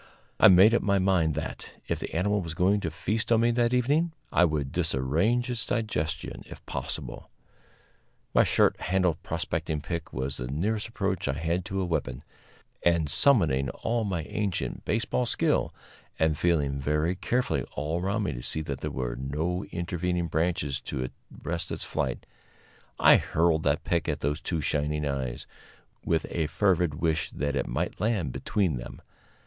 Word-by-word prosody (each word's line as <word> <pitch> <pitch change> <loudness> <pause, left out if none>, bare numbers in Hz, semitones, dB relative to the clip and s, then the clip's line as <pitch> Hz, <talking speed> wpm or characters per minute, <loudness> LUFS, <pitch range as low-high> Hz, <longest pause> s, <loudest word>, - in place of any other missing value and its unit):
I - - +9
made 95 +5 +7
up 120 - +3
my 100 0 +2
mind 90 -5 +2
that, 80 - -5
if - - -1
the - - -5
animal 105 +4 +1
was 85 -2 -6
going 95 +4 +3
to 85 - -2
feast 105 +8 -2
on 115 -1 +5
me 120 +1 +4
that 120 0 +2
evening, 145 +7 +2 0.2
I - - +5
would 75 -4 -1
disarrange 85 - +1
its 125 -2 -2
digestion, 85 -9 -2
if - - -12
possible. - - -5 1.0
My - - +6
short - - +3
handled 90 -3 +1
prospecting 75 - -2
pick 80 +2 -5
was 65 +2 -3
the 60 - -4
nearest 100 - -1
approach 95 -7 -2
I 65 - +1
had 80 +4 -1
to 95 0 -2
a - - 0
weapon, 70 -6 -2 0.6
and, 85 -4 +2
summoning 75 - +3
all 115 - -1
my 90 -6 -2
ancient 100 +2 -3
baseball 115 +3 0
skill, - - +1 0.5
and 80 -1 +2
feeling 75 -4 +1
very 75 +5 +1
carefully 95 - 0
all 80 +4 -2
around 100 +4 0
me 90 - -1
to - - -6
see 80 - -2
that 70 -3 -5
there - - -2
were 60 -2 -3
no 75 +8 -2
intervening 90 0 -2
branches 80 -3 0
to 65 0 -4 0.3
arrest - - -2
its - - -3
flight, - - -2 0.7
I - - +7
hurled 80 -1 +2
that 75 +1 +2
pick 85 -3 0
at - - -2
those 75 +2 -1
two 80 -1 -2
shining 75 +1 0
eyes, 65 -3 -3 0.6
with 80 -2 +1
a 80 -3 0
fervid 90 -4 +2
wish 80 0 0
that 70 +1 -2
it - - -1
might - - -3
land 105 - 0
between 95 -10 0
them. - - -9
85 Hz, 170 wpm, -28 LUFS, 75-100 Hz, 1.0 s, I